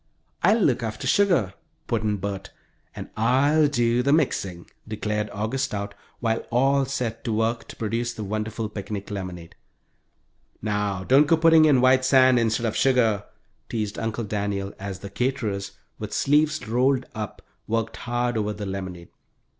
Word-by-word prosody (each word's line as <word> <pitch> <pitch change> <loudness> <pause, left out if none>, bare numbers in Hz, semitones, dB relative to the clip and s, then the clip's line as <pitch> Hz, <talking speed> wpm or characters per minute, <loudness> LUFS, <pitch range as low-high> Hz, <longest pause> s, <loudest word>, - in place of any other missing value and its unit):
"I'll 225 - +4
look 145 - +2
after 110 -2 -4
sugar," 175 - +3 0.3
put 115 -2 -1
in 105 -1 0
Bert. 100 0 -5 0.5
"And - - -8
I'll 140 +7 +3
do 120 -3 +2
the 140 +3 +1
mixing," 100 - 0 0.2
declared 105 -1 -2
August 110 +6 -2
Stout, 100 -5 -4 0.3
while 115 -1 0
all 135 +3 +3
set 120 -4 -3
to 115 - -1
work 115 +2 0
to - - -10
produce 115 +2 -2
the 110 - -6
wonderful 110 +2 -3
picnic 105 -1 -6
lemonade. 90 -4 -6 1.1
"Now, 105 -2 -2
don't 135 +8 +5
go 165 - +4
putting 160 -1 +6
in 140 -5 +5
white 130 0 +5
sand 130 -1 +5
instead 115 0 0
of 110 - -1
sugar," 115 -6 +2 0.4
teased 105 -3 -3
Uncle 115 +1 -2
Daniel, 100 -1 -3
as 95 -1 -5
the 100 - -7
"caterers," 105 -5 -2 0.3
with - - -6
sleeves 150 -1 +2
rolled 130 +3 +2
up, 105 -2 -6 0.2
worked 115 0 -1
hard 120 -1 -1
over 105 0 -1
the 105 0 -6
lemonade. 95 -3 -6
115 Hz, 155 wpm, -24 LUFS, 105-130 Hz, 1.1 s, putting